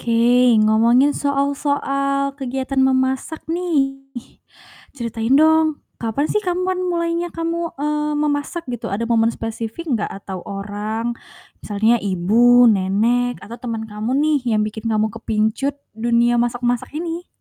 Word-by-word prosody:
Oke, 240 +1 +4
ngomongin 230 +6 +4
soal-soal 275 -1 0
kegiatan 265 +1 -2
memasak 265 +3 0
nih, 315 -5 -1 1.0
ceritain 230 +1 0
dong, 315 0 +3 0.2
kapan 230 +6 -1
sih 425 - +2
kamu 365 -2 -1
pan 370 0 -1
mulainya 340 -1 -1
kamu, 335 0 -2
eee, 300 +1 -1
memasak 295 +3 -1
gitu, 240 - -5
ada 205 +4 -2
momen 230 -1 +2
spesifik 225 +8 -5
gak - - -2
atau 195 -1 -7
orang, 210 +3 -3 0.5
misalnya 220 +3 +1
ibu, 220 +6 +4
nenek, 225 +6 +1
atau 235 +2 -10
temen 230 -3 -4
kamu 220 +4 -3
nih 300 0 +2 0.2
yang 210 - +2
bikin 215 +1 -5
kamu 215 0 0
kepincut 225 +5 -1 0.2
dunia 235 +1 +2
masak-masak 240 0 -1
ini? 335 +2 -4
245 Hz, 130 wpm, -20 LUFS, 225-290 Hz, 1.0 s, Oke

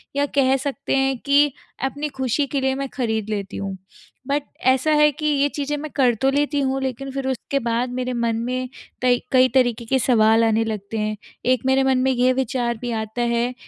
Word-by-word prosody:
या 285 0 +2
कह 265 -1 +4
सकते 280 0 -2
हैं 270 -1 +1
कि 285 0 +4 0.3
अपनी 290 +3 -3
ख़ुशी 265 +2 0
के 275 0 -2
लिए 265 0 +1
मैं 275 -1 -4
खरीद 220 -4 -2
लेती 200 -2 -4
हूँ। 195 -1 -4 0.5
बट 285 +1 0 0.2
ऐसा 260 +4 +3
है 300 0 +5
कि 305 +2 -6
ये 285 -1 +3
चीज़ें 290 0 -2
मैं 305 +1 -6
कर 255 -4 +4
तो 270 - +4
लेती 290 +1 +1
हूँ, 270 0 0
लेकिन 265 +1 -4
फ़िर 270 0 -3
उसके 265 +2 -2
बाद 235 0 -1
मेरे 255 0 -2
मन 235 -1 0
में 255 0 -3 0.3
कई 245 -1 +3
कई 255 -1 +6
तरीके 245 -3 +2
के 265 +3 +1
सवाल 225 -2 +4
आने 225 0 +2
लगते 215 0 -4
हैं। 215 0 -1 0.4
एक 255 - +2
मेरे 265 0 +3
मन 265 -1 +2
में 265 +1 +2
ये 255 +1 +3
विचार 245 -2 -1
भी 245 -1 -3
आता 220 +1 -3
है 235 +1 0
255 Hz, 210 wpm, -22 LUFS, 235-275 Hz, 0.5 s, कई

